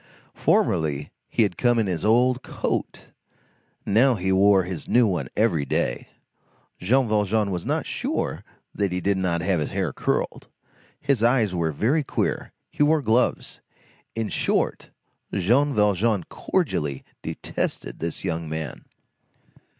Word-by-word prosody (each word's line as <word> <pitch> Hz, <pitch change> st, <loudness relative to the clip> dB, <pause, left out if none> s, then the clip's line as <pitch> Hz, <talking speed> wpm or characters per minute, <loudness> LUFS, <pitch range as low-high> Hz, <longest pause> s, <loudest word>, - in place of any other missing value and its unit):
Formerly 75 Hz, -2 st, +1 dB, 0.2 s
he -, -, +2 dB
had 100 Hz, -4 st, -2 dB
come 120 Hz, -1 st, +3 dB
in 110 Hz, -, +2 dB
his 90 Hz, -5 st, -2 dB
old 125 Hz, +3 st, +3 dB
coat, -, -, -4 dB, 0.7 s
now 120 Hz, +5 st, +4 dB
he 95 Hz, -1 st, -1 dB
wore 95 Hz, 0 st, +5 dB
his 90 Hz, -2 st, -6 dB
new 120 Hz, 0 st, +5 dB
one 95 Hz, -5 st, -1 dB
every 100 Hz, -9 st, +2 dB
day; -, -, -1 dB, 0.7 s
Jean 125 Hz, +7 st, +2 dB
Valjean 105 Hz, -1 st, +1 dB
was 90 Hz, -2 st, -4 dB
not -, -, 0 dB
sure -, -, -3 dB, 0.3 s
that 100 Hz, -2 st, -1 dB
he 90 Hz, -, -1 dB
did 100 Hz, +1 st, 0 dB
not 85 Hz, -2 st, 0 dB
have 90 Hz, -1 st, +1 dB
his 75 Hz, -, -2 dB
hair 95 Hz, -7 st, -2 dB
curled, -, -, -2 dB, 0.5 s
his 140 Hz, -5 st, 0 dB
eyes 115 Hz, -4 st, +3 dB
were 85 Hz, -3 st, 0 dB
very 120 Hz, -, +1 dB
queer, -, -, -2 dB, 0.2 s
he -, -, -5 dB
wore 150 Hz, 0 st, +4 dB
gloves; 115 Hz, +2 st, 0 dB, 0.5 s
in 115 Hz, -1 st, -1 dB
short, -, -, 0 dB, 0.4 s
Jean 120 Hz, +10 st, +2 dB
Valjean 105 Hz, -3 st, +2 dB
cordially 75 Hz, -, -2 dB, 0.2 s
detested -, -, -4 dB
this 85 Hz, 0 st, -4 dB
young 85 Hz, -3 st, -3 dB
man. 80 Hz, -1 st, -5 dB
100 Hz, 140 wpm, -24 LUFS, 85-115 Hz, 0.7 s, wore